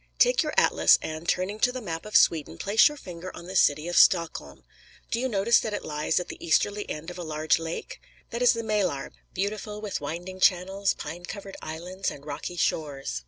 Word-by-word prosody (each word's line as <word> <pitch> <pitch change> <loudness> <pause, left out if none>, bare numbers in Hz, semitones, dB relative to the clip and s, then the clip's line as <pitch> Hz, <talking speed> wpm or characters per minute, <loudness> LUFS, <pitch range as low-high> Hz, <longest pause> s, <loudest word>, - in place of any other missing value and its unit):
Take - - +4
your - - -3
atlas - - +5
and, 160 +2 -5
turning 190 +4 -1
to 250 - +3
the 255 - -5
map 170 -4 -5
of 210 - -8
Sweden, 150 - +4
place 205 - +5
your 295 - -4
finger 180 -5 -8
on 170 - -9
the 185 +2 -8
city 150 -2 +3
of 175 - -3
Stockholm. 170 -3 +2 0.5
Do 230 - 0
you 260 - 0
notice 220 +2 +4
that 215 -2 -3
it - - -6
lies 150 +3 0
at 180 - -5
the - - -9
easterly 205 +5 +1
end 155 +3 -5
of 175 - -9
a - - -4
large 155 0 +1
lake? 165 0 -6 0.3
That 235 - -4
is 245 - +6
the 230 -1 -4
Maelar, 205 -10 -1 0.2
beautiful 210 +2 -3
with 210 -6 -4
winding 175 +5 -6
channels, 190 +2 +2
pine 170 +4 -7
covered 195 +1 -8
islands, 175 +4 -4
and 145 - -10
rocky 155 +4 -6
shores. 140 - -1
180 Hz, 210 wpm, -26 LUFS, 160-210 Hz, 0.5 s, is